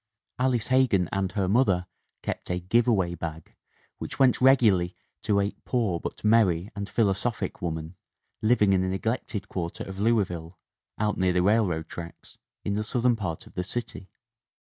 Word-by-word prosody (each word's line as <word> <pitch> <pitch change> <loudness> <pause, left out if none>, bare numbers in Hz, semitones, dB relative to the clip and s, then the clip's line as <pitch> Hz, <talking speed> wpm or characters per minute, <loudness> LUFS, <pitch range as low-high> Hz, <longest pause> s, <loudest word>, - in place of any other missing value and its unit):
Alice 125 -3 +1
Hegan 130 -9 +3
and 95 -1 -1
her 100 -2 0
mother 95 -4 +3 0.4
kept - - -4
a 90 0 0
"give 115 +7 +2
away 95 -7 +2
bag" 80 -1 -7 0.5
which - - -6
went 130 -2 +4
regularly 110 -10 +4 0.3
to 100 -1 +2
a 100 +1 +1
"poor 110 -9 0
but - - -7
merry 105 -4 +3
and 100 0 -5
philo 105 -4 +2
sophic 100 -1 -3
woman" 80 0 -4 0.5
living 110 -3 +4
in 95 - +3
a 95 - 0
neglected 105 +1 -2
quarter 85 -4 -4
of 95 0 -8
Louis 110 -1 +3
ville, 85 0 -8 0.4
out 105 -1 0
near 90 -1 +2
the 90 0 +2
railroad 95 -6 +2
tracks, 85 -1 -10 0.3
in 100 - 0
the 105 +1 -1
southern 120 +3 +1
part 95 -7 -4
of - - -16
the 90 - -2
city. 100 -1 -6
100 Hz, 170 wpm, -27 LUFS, 90-115 Hz, 0.5 s, went